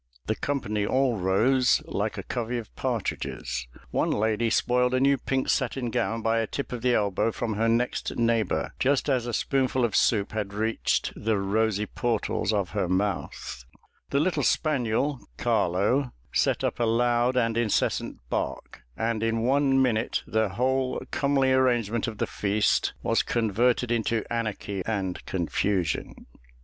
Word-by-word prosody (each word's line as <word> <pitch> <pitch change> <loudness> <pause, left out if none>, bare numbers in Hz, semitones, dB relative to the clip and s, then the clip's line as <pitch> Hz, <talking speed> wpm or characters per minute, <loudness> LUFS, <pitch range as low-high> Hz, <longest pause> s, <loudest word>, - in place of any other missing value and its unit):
The 110 - 0
company 105 -8 -2
all 130 +1 +1
rose, 120 +8 +3
like - - -2
a - - -4
covey 120 0 -3
of 115 -3 -8
partridges: - - -3 0.2
one - - +1
lady 110 +2 +1
spoiled 125 +2 +2
a - - +2
new 140 +1 +4
pink 135 0 -2
satin 125 -1 0
gown 115 -2 -1
by 115 0 +2
a 115 - -1
tip 140 - -5
of 125 -2 -4
the 125 0 +3
elbow 100 +2 +1
from 115 0 -3
her 115 +2 +1
next 120 +2 0
neighbour, 115 -3 +1
just 135 +2 +2
as 125 -3 +1
a - - -2
spoonful 130 +1 +1
of 115 - -2
soup 105 -3 +2
had 105 -2 -4
reached 110 +2 0
"the 110 0 0
rosy 105 +1 +1
portals 115 -2 -1
of 100 -4 -1
her 100 -3 -1
mouth;" 95 -9 -2 0.5
the 140 - +1
little 175 +4 +1
spaniel, 135 -2 +1 0.2
Carlo, 105 +10 +1 0.2
set - - +1
up - - -1
a - - +2
loud 120 +2 +2
and 115 -2 +2
incessant 115 -2 0
bark; - - -4 0.2
and 115 -1 -1
in 115 0 0
one 135 +1 +3
minute 120 -4 +1
the 110 -1 +1
whole 130 +5 0
comely 135 -2 +2
arrangement 120 -3 +2
of 110 -2 -5
the - - 0
feast 105 +1 +1
was - - +2
converted 120 +2 +1
into 115 -1 0
anarchy 105 -4 -3
and 95 -5 -2
confusion. 90 0 -1
115 Hz, 155 wpm, -26 LUFS, 105-125 Hz, 0.5 s, new